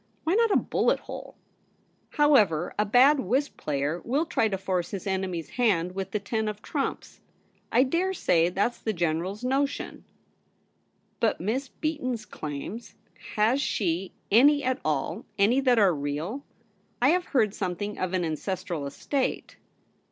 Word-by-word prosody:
Why 325 Hz, -, +1 dB
not 460 Hz, +2 st, +4 dB
a -, -, +3 dB
bullet -, -, +1 dB
hole? -, -, -9 dB, 0.8 s
However, 210 Hz, -, +4 dB
a 210 Hz, -, +3 dB
bad 265 Hz, +7 st, +6 dB
whist 265 Hz, +7 st, 0 dB
player 145 Hz, +3 st, -2 dB
will 285 Hz, +7 st, 0 dB
try 230 Hz, -8 st, +1 dB
to 195 Hz, -3 st, -2 dB
force 185 Hz, -2 st, -2 dB
his 195 Hz, -3 st, -6 dB
enemy's 190 Hz, -4 st, -2 dB
hand 185 Hz, -8 st, +1 dB
with 195 Hz, 0 st, -4 dB
the 210 Hz, -, -1 dB
ten 220 Hz, +2 st, -2 dB
of 210 Hz, 0 st, -5 dB
trumps.. 280 Hz, -3 st, -4 dB, 0.5 s
I 245 Hz, -, +5 dB
dare 340 Hz, +8 st, 0 dB
say 170 Hz, -, +3 dB
that's 200 Hz, +7 st, -1 dB
the 220 Hz, -, -2 dB
General's 175 Hz, +5 st, -2 dB
notion.' 275 Hz, +2 st, -1 dB, 0.6 s
* -, -, -43 dB
But 225 Hz, -, +1 dB
Miss 240 Hz, +10 st, -1 dB
Beaton's 255 Hz, -7 st, -3 dB
claims? 155 Hz, +10 st, -7 dB, 0.4 s
Has 225 Hz, +6 st, +3 dB
she 185 Hz, -, -1 dB, 0.2 s
any 285 Hz, +6 st, +6 dB
at 260 Hz, +1 st, 0 dB
all -, -, -1 dB
— -, -, -40 dB
any 250 Hz, +4 st, +3 dB
that 255 Hz, -3 st, +3 dB
are 200 Hz, -5 st, +5 dB
real? 150 Hz, -, -3 dB, 0.6 s
I 255 Hz, -, +4 dB
have 355 Hz, +2 st, +2 dB
heard 220 Hz, -7 st, +1 dB
something 205 Hz, +1 st, -3 dB
of 185 Hz, 0 st, -2 dB
an 180 Hz, -2 st, +1 dB
ancestral 170 Hz, -1 st, -3 dB
estate.' 265 Hz, -, -3 dB
210 Hz, 155 wpm, -27 LUFS, 180-265 Hz, 0.8 s, bad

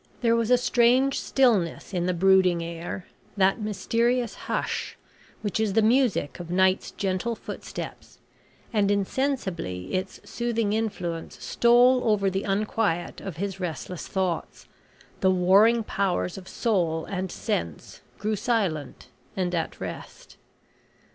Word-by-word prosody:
There 230 Hz, -1 st, +3 dB
was 230 Hz, -1 st, 0 dB
a 250 Hz, -, +6 dB
strange 250 Hz, +3 st, +3 dB
stillness 215 Hz, -9 st, +1 dB
in 175 Hz, -1 st, 0 dB
the 180 Hz, -, +1 dB
brooding 185 Hz, -1 st, +4 dB
air 170 Hz, +2 st, -6 dB, 0.3 s
that 195 Hz, +3 st, +3 dB
mysterious 230 Hz, +3 st, 0 dB
hush, -, -, -3 dB, 0.5 s
which 205 Hz, 0 st, -1 dB
is 215 Hz, -3 st, +1 dB
the 220 Hz, +1 st, +3 dB
music 230 Hz, -, +2 dB
of 175 Hz, -1 st, -7 dB
night's 190 Hz, +1 st, +2 dB
gentle 195 Hz, +4 st, -2 dB
footsteps, -, -, -8 dB, 0.6 s
and 205 Hz, -2 st, +2 dB
insensibly 195 Hz, -, -2 dB
its 185 Hz, +1 st, -3 dB
soothing 230 Hz, -3 st, -1 dB
influence 180 Hz, -7 st, -3 dB
stole 245 Hz, +2 st, +5 dB
over 200 Hz, -3 st, +2 dB
the 190 Hz, +1 st, -1 dB
unquiet 200 Hz, -3 st, -1 dB
of 185 Hz, -5 st, -7 dB
his 195 Hz, +1 st, -3 dB
restless 180 Hz, -1 st, -5 dB
thoughts 185 Hz, -4 st, -3 dB, 0.5 s
the 190 Hz, -, +3 dB
warring 195 Hz, +6 st, +5 dB
powers 195 Hz, -3 st, -1 dB
of 190 Hz, -1 st, -10 dB
soul 170 Hz, -8 st, 0 dB
and 185 Hz, -1 st, -4 dB
sense 85 Hz, -2 st, -4 dB, 0.2 s
grew 215 Hz, +1 st, -1 dB
silent 190 Hz, -, -2 dB, 0.3 s
and 180 Hz, -1 st, -1 dB
at 165 Hz, -2 st, -2 dB
rest. -, -, -8 dB
195 Hz, 130 wpm, -26 LUFS, 180-230 Hz, 0.6 s, a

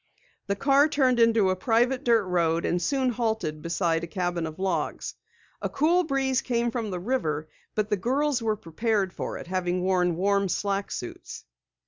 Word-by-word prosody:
The 200 Hz, -, 0 dB
car 275 Hz, +6 st, +4 dB
turned 260 Hz, -5 st, +2 dB
into 225 Hz, -4 st, +4 dB
a -, -, 0 dB
private 240 Hz, +6 st, +1 dB
dirt 230 Hz, -3 st, +4 dB
road 170 Hz, -2 st, +1 dB
and 175 Hz, -, 0 dB
soon 265 Hz, +6 st, +1 dB
halted 220 Hz, -10 st, -2 dB
beside 170 Hz, 0 st, 0 dB
a -, -, -3 dB
cabin 175 Hz, -2 st, -2 dB
of 155 Hz, -, -8 dB
logs. 190 Hz, 0 st, -2 dB, 0.5 s
A -, -, -2 dB
cool 335 Hz, +5 st, +2 dB
breeze 270 Hz, -3 st, +1 dB
came 235 Hz, -1 st, 0 dB
from 230 Hz, -3 st, -3 dB
the 180 Hz, -2 st, -3 dB
river, 160 Hz, -, -1 dB, 0.3 s
but 215 Hz, 0 st, -1 dB
the 210 Hz, -, +2 dB
girls 265 Hz, +6 st, 0 dB
were 220 Hz, -1 st, +1 dB
prepared 200 Hz, +1 st, -1 dB
for -, -, -4 dB
it, -, -, -8 dB
having 180 Hz, 0 st, -1 dB
worn 180 Hz, -2 st, +2 dB
warm 200 Hz, +2 st, +1 dB
slack 200 Hz, +2 st, -1 dB
suits. 120 Hz, -, -7 dB
200 Hz, 175 wpm, -26 LUFS, 180-245 Hz, 0.5 s, car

